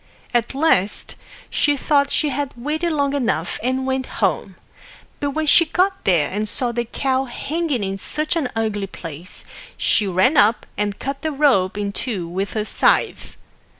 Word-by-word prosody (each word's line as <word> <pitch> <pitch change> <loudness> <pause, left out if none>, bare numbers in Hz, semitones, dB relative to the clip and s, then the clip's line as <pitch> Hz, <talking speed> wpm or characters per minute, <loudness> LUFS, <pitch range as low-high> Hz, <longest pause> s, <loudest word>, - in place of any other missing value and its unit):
At 240 +2 0
last 270 - +1 0.4
she 290 -1 +2
thought 280 0 +2
she'd 285 -2 0
waited 310 +7 -2
long 285 -2 0
enough, 225 - -1
and 260 +3 -1
went 265 0 -1
home. - - 0 0.6
But 285 - -1
when 310 +3 -2
she 335 +3 +6
got 375 +4 0
there 170 -6 +3
and 210 +2 -2
saw 245 +2 +2
the 240 0 -2
cow 265 +2 -1
hanging 285 0 -2
in 195 0 -3
such 305 - -1
an 300 -7 -1
ugly 215 -3 -1
place, 165 -1 -9 0.3
she 210 - +2
ran 190 - +2
up 215 +3 +4
and 205 -1 -2
cut 275 +1 -5
the 315 - -2
rope 255 -11 +2
in 205 -1 -2
two 200 -5 -3
with 190 +4 -3
her 215 -1 -1
scythe. - - +1
250 Hz, 165 wpm, -21 LUFS, 205-290 Hz, 0.6 s, she